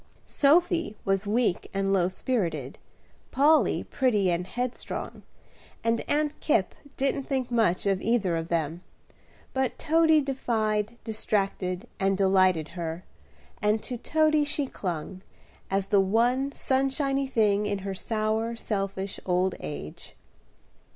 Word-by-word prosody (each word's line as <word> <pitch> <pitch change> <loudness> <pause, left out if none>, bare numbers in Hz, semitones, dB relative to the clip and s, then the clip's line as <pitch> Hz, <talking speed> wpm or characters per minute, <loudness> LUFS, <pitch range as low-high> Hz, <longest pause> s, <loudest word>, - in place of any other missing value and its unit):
Sophy 330 -4 +2
was 195 +1 +1
weak 220 -3 0
and 195 0 +1
low 180 -2 +3
spirited, 195 -2 -2 0.5
Polly 305 +3 +3
pretty 210 -8 +1
and 175 +1 -1
headstrong, 245 +4 -4 0.6
and 230 0 +1
Aunt 300 0 0
Kipp 200 - +1 0.2
didn't 275 0 0
think 260 -3 -2
much 220 -7 +2
of 195 -1 +1
either 210 -7 +1
of 165 0 -3
them; 165 0 -1 0.7
but 265 -1 -1
Toady 320 0 +4
defied, 230 -5 -1
distracted, 200 -2 -2
and 195 0 +2
delighted 185 -5 +3
her, 170 0 -5 0.6
and 210 +1 +1
to 250 - -4
Toady 310 +4 +2
she 290 0 -1
clung, 185 - -5 0.5
as 195 0 0
the 200 0 +4
one 240 +7 +2
sunshiny 270 +1 0
thing 210 -4 +2
in 205 -1 -1
her 195 - -2
sour, 220 +3 -1
selfish 195 -3 -3
old 180 +1 +2
age. 75 - -8
215 Hz, 125 wpm, -27 LUFS, 190-265 Hz, 0.7 s, Toady